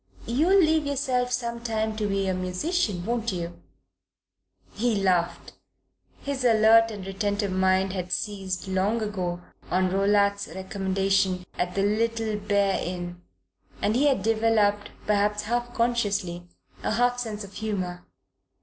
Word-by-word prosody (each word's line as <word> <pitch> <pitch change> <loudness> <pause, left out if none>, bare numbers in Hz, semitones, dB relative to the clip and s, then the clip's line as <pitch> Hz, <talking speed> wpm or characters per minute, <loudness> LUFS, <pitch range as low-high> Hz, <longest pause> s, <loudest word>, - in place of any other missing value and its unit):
"You'll 315 +11 +3
leave 315 -3 +3
yourself 255 -3 0
some 235 -1 -2
time 220 -2 -1
to 210 -1 0
be 195 -1 0
a 190 - +1
musician, 185 - -1
won't 235 0 -1
you?" 175 -1 -5 1.1
He 230 +1 +1
laughed. 185 -4 0 0.7
His 280 -2 -3
alert 225 -1 +6
and 205 -4 -7
retentive 200 +1 -1
mind 190 0 +2
had 180 -2 -4
seized, 195 -3 -3
long 195 +4 0
ago, 180 -4 -3 0.3
on 185 0 +1
Rowlatt's 200 +1 +2
recommendation 190 -1 0
at 180 0 -2
the 195 - +1
Little 225 +1 0
Bear 200 -1 +1
Inn, 175 0 -5 0.6
and 215 - +1
he 285 +4 +4
had 265 -9 +2
developed, 215 -2 +2 0.2
perhaps 210 0 +1
half 240 +2 -1
consciously, 205 -7 0 0.3
a - - -1
half 245 +2 +2
sense 215 -3 -4
of 200 0 -11
humour. 185 -5 -3
205 Hz, 135 wpm, -26 LUFS, 190-230 Hz, 1.1 s, alert